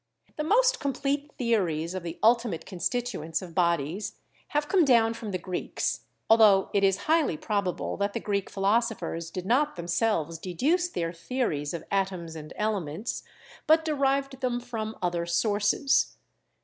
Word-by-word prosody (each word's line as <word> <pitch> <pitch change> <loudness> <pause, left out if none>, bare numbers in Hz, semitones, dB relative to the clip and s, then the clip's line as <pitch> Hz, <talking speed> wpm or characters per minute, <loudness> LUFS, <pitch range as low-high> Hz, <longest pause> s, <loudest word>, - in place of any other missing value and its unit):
The 305 - -2
most - - +3
complete 280 +1 -1
theories 180 -9 0
of 185 - -3
the 170 0 -6
ultimate 230 -7 +3
constituents 180 -5 -2
of 175 -2 -9
bodies 170 +2 0 0.3
have 295 0 -1
come 370 0 +4
down 230 -5 +4
from 225 -2 -6
the 185 - -1
Greeks, 180 0 -3 0.2
although 215 -4 +6
it 200 - +2
is 195 0 +3
highly 310 - +2
probable 200 0 -2
that 200 0 -1
the - - -2
Greek 200 -3 -2
philosophers 195 -5 0
did 180 +1 -6
not 280 +8 +2
them 170 -1 -6
selves 170 -5 0
deduce 300 - 0
their 170 - -3
theories 165 - -2
of 170 - -5
atoms 185 -4 -1
and 155 -1 -8
elements, 205 -2 -2 0.5
but 320 +1 +5
derived 275 -3 0
them 245 -2 0
from 225 -3 -5
other 175 -1 -1
sources. 205 - +2
210 Hz, 150 wpm, -27 LUFS, 175-255 Hz, 0.5 s, although